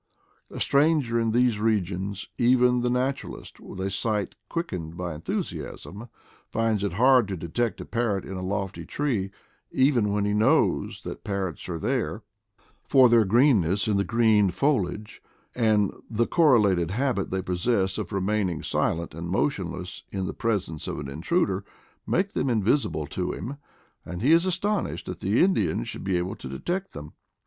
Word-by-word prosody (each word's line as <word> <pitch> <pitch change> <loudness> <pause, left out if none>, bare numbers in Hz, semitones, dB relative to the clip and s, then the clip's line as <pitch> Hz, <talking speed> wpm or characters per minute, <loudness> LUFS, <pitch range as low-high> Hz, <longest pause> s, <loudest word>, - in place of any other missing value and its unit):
A - - -8
stranger 140 -5 +2
in 115 -1 +1
these 120 -1 +2
regions, 100 -2 -1
even 125 0 +4
the 125 - +1
natural 130 +2 -1
ist - - -14
with - - -10
a 95 +1 -2
sight 105 0 -1 0.2
quickened 90 - -4
by 90 -2 -3
enthusiasm, 100 +7 -5 0.4
finds 110 -3 0
it 100 -4 -1
hard 125 +2 +5
to 95 -2 -4
detect 105 +8 -2
a - - -7
parrot 115 -5 -1
in 95 - -6
a 90 - -4
lofty 95 0 -3
tree, 120 -10 -1 0.4
even 130 -6 +2
when 100 0 0
he 105 - 0
knows 115 +9 +2
that - - -7
parrots 95 -4 -3
are 85 - -2
there; 115 +1 -2 0.7
for 130 -3 +7
their 115 -1 +6
green 120 +2 +5
ness 95 +6 0
in 105 -2 +2
the 100 - +2
green 110 -3 +3
foliage, 105 - -1 0.3
and 110 -4 +2 0.2
the 115 +1 +1
correlated 105 - +3
habit 120 -1 -1
they 95 0 -2
possess 95 +1 0
of - - -5
remaining 95 -3 -1
silent 85 -1 -1
and 85 +2 -6
motionless 90 - -2
in 95 -1 -2
the - - -4
presence 100 -9 -2
of - - -3
an 75 - -5
intruder, 95 - 0 0.4
make 190 +3 0
them - - 0
invisible 110 - +1
to - - -3
him, 125 +10 -6 0.5
and 90 +4 -6
he 140 - +4
is 170 +3 +5
astonished 205 +3 -1
that - - -6
the 100 - +2
Indian 105 - +1
should - - -7
be 95 -2 0
able 90 +1 -2
to 65 - -9
detect 180 - -3
them. 75 0 -9
105 Hz, 170 wpm, -26 LUFS, 95-125 Hz, 0.7 s, for